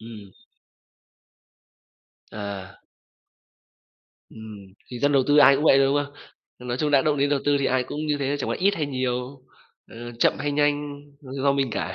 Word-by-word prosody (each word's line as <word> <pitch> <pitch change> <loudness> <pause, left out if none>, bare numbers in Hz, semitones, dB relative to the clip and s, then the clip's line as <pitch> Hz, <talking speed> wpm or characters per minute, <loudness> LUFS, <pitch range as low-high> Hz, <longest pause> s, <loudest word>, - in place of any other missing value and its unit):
Ừm. 110 -4 -12 2.0
À. 100 -2 -8 1.5
Ừm, 110 -3 -11 0.2
thì 125 - -6
dân 145 +3 +1
đầu 135 -2 +4
tư 145 - +3
ai 140 -2 +7
cũng 150 - -2
vậy 135 - +6
thôi, 135 - +4
đúng 140 +1 +1
không? 145 0 -15 0.5
Nói 120 - -2
chung 150 +1 0
đã 140 -2 +4
động 150 0 +1
đến 140 +1 +1
đầu 145 -1 +1
tư 145 0 +2
thì 140 - 0
ai 130 -1 +1
cũng 150 +4 -5
như 150 -1 0
thế, 140 +1 -1
chẳng - - -3
qua - - -1
ít 200 +2 +2
hay 155 -6 -2
nhiều, 130 0 -4 0.4
ờ, - - -15 0.2
chậm - - +2
hay 145 +1 -2
nhanh, 145 0 -1 0.2
do 140 0 -1
mình 135 -2 -1
cả. - - -4
140 Hz, 185 wpm, -24 LUFS, 125-145 Hz, 2.0 s, ai